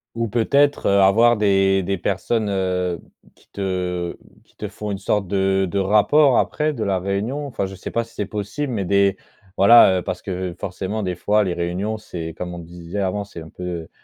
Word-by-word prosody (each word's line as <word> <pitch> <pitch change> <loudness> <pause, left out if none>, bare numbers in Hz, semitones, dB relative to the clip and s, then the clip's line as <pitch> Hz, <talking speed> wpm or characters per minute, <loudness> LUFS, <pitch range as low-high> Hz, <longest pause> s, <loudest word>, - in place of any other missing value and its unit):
Ou 115 -1 -1
peut-être, 140 +6 +2
heu, 100 0 +4
avoir 115 +5 +5
des 95 -2 +2
des 100 +2 -1
personnes, 105 +4 -1
heu, 90 -3 -1 0.3
qui - - -27
te 90 -3 -3 0.3
qui - - -30
te - - -6
font 105 -1 -6
une 100 - -2
sorte 100 0 -1
de 95 0 +1
de 100 - -3
rapport 110 +8 +4
après, 155 +1 +1
de 120 -7 -3
la 95 -2 0
réunion? 100 +10 -2
Enfin, 115 -7 -3
je 95 0 -7
sais 95 - -7
pas 115 0 -1
si 115 - -20
c'est 105 - -3
possible, 105 +8 -4
mais 105 -5 -2
des 100 +1 +2 0.4
voilà, 100 -2 +7
heu, - - -4
parce - - -4
que 90 -3 -4
forcément 95 +3 -4
des 90 -2 -2
fois 105 +4 +2
les 90 -3 -1
réunions, 90 +6 -2
c'est 80 -6 -7
comme 90 +1 -6
on 85 - -7
disait 85 +2 -7
avant, 100 +2 -1
c'est 85 -4 -10
un 80 - -11
peu, 90 -2 -6
100 Hz, 205 wpm, -21 LUFS, 90-105 Hz, 0.4 s, voilà